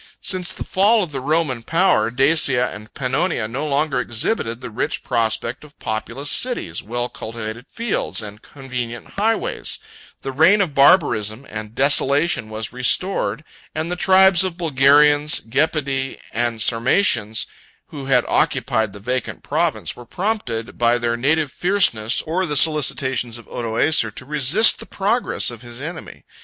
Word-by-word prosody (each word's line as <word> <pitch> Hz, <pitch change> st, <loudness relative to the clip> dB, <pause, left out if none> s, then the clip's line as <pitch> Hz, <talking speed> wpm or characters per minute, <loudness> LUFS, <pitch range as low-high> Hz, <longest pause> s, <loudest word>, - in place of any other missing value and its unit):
Since 185 Hz, -2 st, -1 dB
the -, -, -5 dB
fall 205 Hz, +3 st, +3 dB
of 170 Hz, -, -6 dB
the 135 Hz, -2 st, -4 dB
Roman 150 Hz, -3 st, 0 dB
power, 165 Hz, -, +2 dB
Dacia 135 Hz, -1 st, +2 dB
and 105 Hz, +1 st, -11 dB
Pannonia 130 Hz, -2 st, -1 dB
no 135 Hz, +7 st, -4 dB
longer 140 Hz, -1 st, 0 dB
exhibited 115 Hz, -, -2 dB
the -, -, -8 dB
rich 110 Hz, -, -3 dB
prospect 115 Hz, +1 st, -2 dB
of 150 Hz, 0 st, -17 dB
populous 115 Hz, +6 st, -3 dB
cities, 240 Hz, -, 0 dB
well 120 Hz, +2 st, -3 dB
cultivated 115 Hz, +2 st, -7 dB
fields, 230 Hz, -, -3 dB
and 105 Hz, +1 st, -10 dB
convenient 125 Hz, -4 st, -7 dB
highways: 220 Hz, +1 st, -1 dB, 0.5 s
the 135 Hz, -, -4 dB
reign 165 Hz, +10 st, +4 dB
of 180 Hz, -7 st, 0 dB
barbarism 135 Hz, -, +3 dB
and 110 Hz, 0 st, -8 dB
desolation 140 Hz, -2 st, +3 dB
was 110 Hz, +1 st, -6 dB
restored, 125 Hz, -, 0 dB, 0.3 s
and 160 Hz, +2 st, -3 dB
the -, -, -1 dB
tribes 190 Hz, 0 st, +5 dB
of 185 Hz, -3 st, -3 dB
Bulgarians, 145 Hz, -1 st, +4 dB
Gepidae, 135 Hz, +1 st, -1 dB
and 120 Hz, -1 st, -2 dB
Sarmatians, 115 Hz, -, +2 dB, 0.4 s
who 140 Hz, -3 st, -8 dB
had 135 Hz, -, +3 dB
occupied 110 Hz, -3 st, 0 dB
the 100 Hz, -, -10 dB
vacant 125 Hz, +4 st, -4 dB
province, -, -, -1 dB
were 120 Hz, -, -11 dB
prompted 175 Hz, -, -3 dB
by 120 Hz, 0 st, +3 dB
their 120 Hz, -1 st, -1 dB
native 145 Hz, +4 st, 0 dB
fierceness, 130 Hz, -, +1 dB
or 180 Hz, +4 st, -1 dB
the 150 Hz, -2 st, -1 dB
solicitations 130 Hz, -6 st, +1 dB
of 120 Hz, -, -13 dB
Odoacer, 115 Hz, +2 st, +1 dB
to 110 Hz, -, -11 dB
resist 150 Hz, -, +4 dB
the -, -, -9 dB
progress 205 Hz, -, -1 dB
of 120 Hz, -2 st, -11 dB
his 120 Hz, 0 st, -10 dB
enemy. 160 Hz, +4 st, -8 dB
135 Hz, 150 wpm, -20 LUFS, 115-160 Hz, 0.5 s, tribes